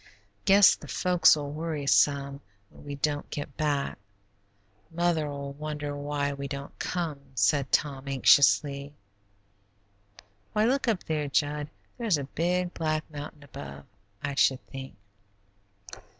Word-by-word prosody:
"Guess 200 0 +7
the - - -12
folks'll 160 -5 +3
worry 155 -1 -3
some 140 0 +2 0.3
when - - -16
we 145 -1 -6
don't 145 +1 -2
get 145 -2 -6
back. 145 -6 -1 0.9
Mother'll 155 -5 -1
wonder 150 0 -5
why 145 0 -2
we 140 0 -5
don't 140 0 -7
come," 165 -5 -2 0.2
said 140 +1 +2
Tom, 140 -2 0
anxiously. 140 +1 +4 1.6
"Why, 215 +1 +3
look 265 +2 +1
up 215 -6 +1
there, 150 -2 -2
Jud; 145 +1 0 0.3
there's 220 -9 +2
a 140 - -3
big, 175 +5 -1
black 155 -1 -1
mountain 145 0 -8
above, 70 - -9 0.4
I 140 -1 -2
should 135 -1 +2
think." 135 -3 -9
145 Hz, 120 wpm, -28 LUFS, 140-160 Hz, 1.6 s, Guess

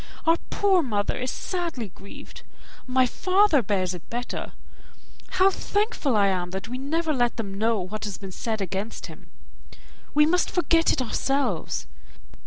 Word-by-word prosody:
Our 330 +1 +5
poor 390 -3 +3
mother 210 -8 -1
is 255 +1 -2
sadly 335 - -3
grieved. 195 +2 -12 0.5
My 255 0 +4
father 370 +3 +3
bears 185 -4 0
it 175 -3 -10
better. 245 +1 -4 0.8
How 375 +1 +5
thankful 405 - 0
am 190 -3 +2
I, - - -11
that 190 +3 -5
we 250 +2 -5
never 315 +4 0
let 245 -3 +1
them 205 -4 -4
know 225 0 +2
what 205 +4 -4
has 200 -3 -4
been 195 -2 -8
said 220 +3 -3
against 195 +3 -3
him; - - -12 0.9
we 300 0 +6
must 355 +3 +2
forget 335 -2 +3
it 265 - +1
ourselves. 275 +3 -1
250 Hz, 155 wpm, -25 LUFS, 205-330 Hz, 0.9 s, we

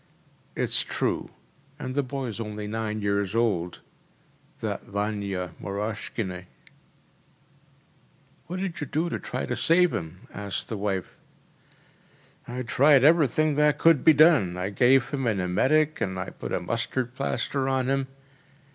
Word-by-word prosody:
“It’s - - +1
true. - - -2 0.5
And 130 - -5
the 145 - +1
boy’s 130 -4 -5
only 105 -1 -5
nine 110 0 -3
years 100 0 0
old, 95 -7 0 0.8
that - - -3
Vania 100 -3 -3
Moroshkine.‚ÄĚ 100 -2 -4 2.0
“What 180 +3 -4
did 185 -5 -4
you 145 - -3
do 160 +6 -1
to - - -2
try - - -4
to - - -2
save 175 0 +4
him?‚ÄĚ 90 +3 -7
asked 100 -1 -3
the 110 - -3
wife. 95 -3 -3 1.3
“I 125 +1 -4
tried 135 +3 +4
everything 155 -1 +4
that 150 0 +3
could 165 -3 +4
be 160 - +7
done. 145 - +5
I 90 +2 -2
gave 125 +4 +4
him 135 -3 -1
an 105 -4 +1
emetic 145 +13 +2
and 95 -1 -1 0.2
put - - -5
a - - 0
mustard 120 +5 -2
plaster 130 - -1
on 130 -1 0
him. 135 0 0
115 Hz, 140 wpm, -26 LUFS, 100-140 Hz, 2.0 s, be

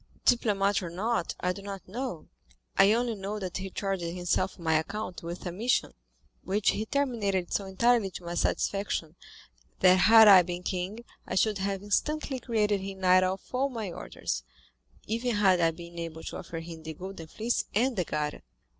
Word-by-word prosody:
"Diplomat 205 -5 +3
or 175 - -5
not, 195 +2 -1
I 180 0 +1
don't 195 0 -8
know; 235 -4 -5 0.5
I 200 - +6
only 235 +1 +1
know 200 0 -4
that 185 -3 -4
he 190 0 -5
charged 195 -1 -2
himself 175 +2 -1
on 170 - -12
my 160 - +3
account 200 +2 -5
with 170 +2 -7
a 175 - -2
mission, 230 +8 0 0.5
which 200 +3 +2
he 215 +1 -3
terminated 220 -10 0
so 200 - 0
entirely 230 +1 +2
to 180 - -9
my 170 0 -5
satisfaction, 175 -2 -1 0.7
that 185 0 +7
had 220 +3 +8
I 195 -3 +10
been 175 0 -5
king, 190 +6 -3 0.2
I - - -3
should 210 +1 +2
have 195 0 -2
instantly 275 +6 -1
created 210 -4 +1
him 195 0 -7
knight 185 0 +5
of 185 +1 -1
all 265 +2 +1
my 225 -7 -4
orders, 60 - -4 0.6
even 235 +2 -1
had 190 -4 +4
I 165 - +4
been 170 +1 -9
able 160 -1 -6
to - - -6
offer 165 -1 -6
him 165 -1 -9
the 160 0 -7
Golden 185 -1 -8
Fleece 225 +8 -1
and 245 +4 +2
the 180 - +1
Garter." 150 -2 -3
195 Hz, 180 wpm, -29 LUFS, 175-220 Hz, 0.7 s, I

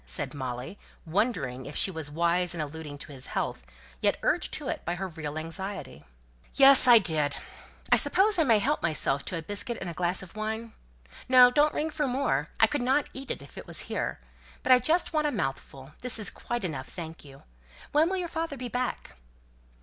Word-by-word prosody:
said - - -3
Molly, 130 +5 -6 0.3
wondering 160 - -1
if 145 - -8
she 190 - +4
was 160 -4 -4
wise 170 +3 0
in - - -6
alluding 150 -1 -6
to 150 - -9
his 130 -2 -9
health, - - -3 0.4
yet - - +2
urged - - +1
to - - -2
it - - -3
by 175 - -2
her 190 +2 -4
real 155 -2 -6
anxiety. 165 - -6 0.5
"Yes, 275 -1 +8
I 240 -1 +10
did. 155 -8 +1 0.5
I - - +7
suppose 410 0 +4
I - - +5
may 230 -6 +4
help 280 +9 0
myself 140 -4 0
to 180 - -3
a 165 - -5
biscuit 205 +6 -3
and 190 - -6
a 170 - -4
glass 180 +2 0
of 185 - -13
wine? 220 +1 -4 0.6
No, 250 -1 +8
don't 295 +3 +3
ring 315 +1 -1
for 300 -2 -1
more. 265 +2 0
I - - +7
could 290 -2 -2
not 265 +3 +1
eat 270 +1 -8
it - - -3
if - - -11
it - - -11
was - - -2
here. - - -3 0.4
But - - +2
I 250 - +8
just 335 +6 +1
want 305 -1 +2
a - - 0
mouthful; 135 - -4
this 250 -1 +1
is 210 -4 -2
quite 240 -4 -4
enough, 140 -7 -4
thank 165 -2 -8
you. 135 -2 -15 0.5
When 310 +3 +3
will 380 - -1
your 360 -2 -2
father 325 -3 -4
be 250 -1 -5
back?" 250 +1 -3
195 Hz, 210 wpm, -28 LUFS, 155-255 Hz, 0.6 s, I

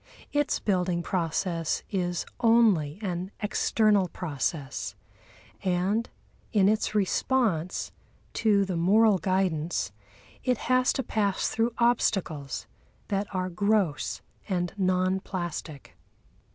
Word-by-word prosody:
Its 290 0 +1
building 180 -3 0
process 165 -1 -1
is 180 -3 -1
only 220 - +4
an 180 -1 -3
external 210 -1 +2
process, 145 -4 -3 0.7
and 190 +5 0 0.4
in 200 -4 +4
its 215 0 +1
response 200 -4 +1 0.4
to 205 -3 +3
the 185 -2 -3
moral 200 +4 +4
guidance 170 - 0 0.5
it 250 -1 +1
has 255 0 +2
to 265 - -2
pass 205 -4 0
through 230 +1 +1
obstacles 195 - 0 0.4
that 200 0 0
are 185 0 -2
gross 200 -3 0 0.3
and 175 -3 -1
non 185 -1 +1
plastic. 170 - -6
190 Hz, 100 wpm, -27 LUFS, 175-215 Hz, 0.7 s, only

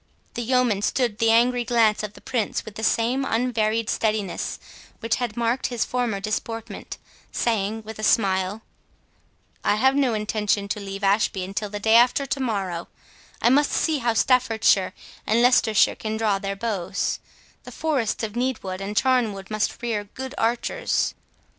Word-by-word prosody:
The 240 - -3
yeoman 240 -4 +2
stood 235 0 0
the 225 - +3
angry 240 +2 +4
glance 230 -3 +3
of 210 -1 -5
the - - -15
Prince 245 -5 -2
with 220 - -9
the 220 - -7
same 240 +4 +1
unvaried 225 -3 0
steadiness 215 -5 -1 0.4
which 230 -1 0
had 240 -3 -3
marked 235 +2 0
his 240 -2 -1
former 245 -5 -1
deportment, 225 +2 -5 0.3
saying, 220 -1 -1
with 220 0 -9
a - - -5
smile, 195 0 +1 1.0
"I - - +3
have 265 +5 +3
no 265 -5 +2
intention 210 -1 0
to 210 - -2
leave 195 0 -7
Ashby 195 -1 +2
until 200 +3 -4
the 205 0 -5
day 220 +2 +2
after 250 +3 +4
to 270 +1 -2
morrow—I 200 0 -3
must 290 +2 +3
see 315 -3 +1
how 235 -2 0
Staffordshire 225 -7 +3 0.3
and 230 +3 +3
Leicestershire 235 -4 +4
can 220 0 -4
draw 210 -3 +1
their 195 0 -3
bows—the 200 -4 -4
forests 270 -10 -1
of 220 - -2
Needwood 230 -7 -2
and 205 +2 -5
Charnwood 225 -7 +1
must 215 +2 -2
rear 215 -3 -1
good 265 +6 -8
archers." 240 - 0
225 Hz, 155 wpm, -24 LUFS, 205-245 Hz, 1.0 s, angry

